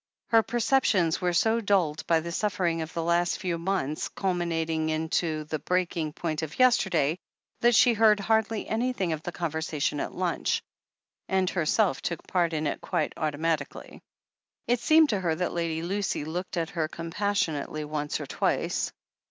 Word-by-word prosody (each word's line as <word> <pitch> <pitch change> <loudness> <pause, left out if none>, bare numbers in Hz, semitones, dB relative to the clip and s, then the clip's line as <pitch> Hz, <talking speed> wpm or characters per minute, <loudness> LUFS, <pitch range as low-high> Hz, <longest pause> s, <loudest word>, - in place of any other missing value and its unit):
Her 225 -1 +6
perceptions 225 -8 +2
were 180 -1 +1
so 225 +6 +2
dulled 185 -8 +1
by 165 -1 +3
the 170 +1 -5
suflFering 175 -4 0
of 160 0 -5
the 165 - -3
last 170 +1 +1
few 175 -3 -2
months, 165 -5 -1
culminating 165 -4 -1
in 160 +1 -1
the 155 -2 -1
breaking 175 -4 -1
point 155 -2 -3
of 160 -2 -6
yesterday, 185 - +3 0.4
that 240 0 +4
she 240 +4 +6
heard 215 -1 +5
hardly 220 +1 0
anything 220 -6 0
of 155 - -4
the 175 - -5
conversation 160 -3 -2
at - - -3
lunch, 180 -1 -1 0.7
and 190 -1 +2
herself 185 +4 +1
took 170 - -4
part 175 -2 +1
in 155 0 -1
it 145 - -2
quite 170 -5 -1
automatically. 155 +1 -3 0.6
It 245 0 +1
seemed 315 +3 +5
to 205 - +1
her 170 -4 0
that 180 +2 -2
Lady 165 -1 -2
Lucy 195 -4 -2
looked 180 +3 -4
at 165 -1 -1
her 160 -3 -1
com 165 +1 -7
passionately 165 -7 -1
once 150 -1 -3
or - - -5
twice. - - -1
170 Hz, 165 wpm, -27 LUFS, 160-200 Hz, 0.7 s, Her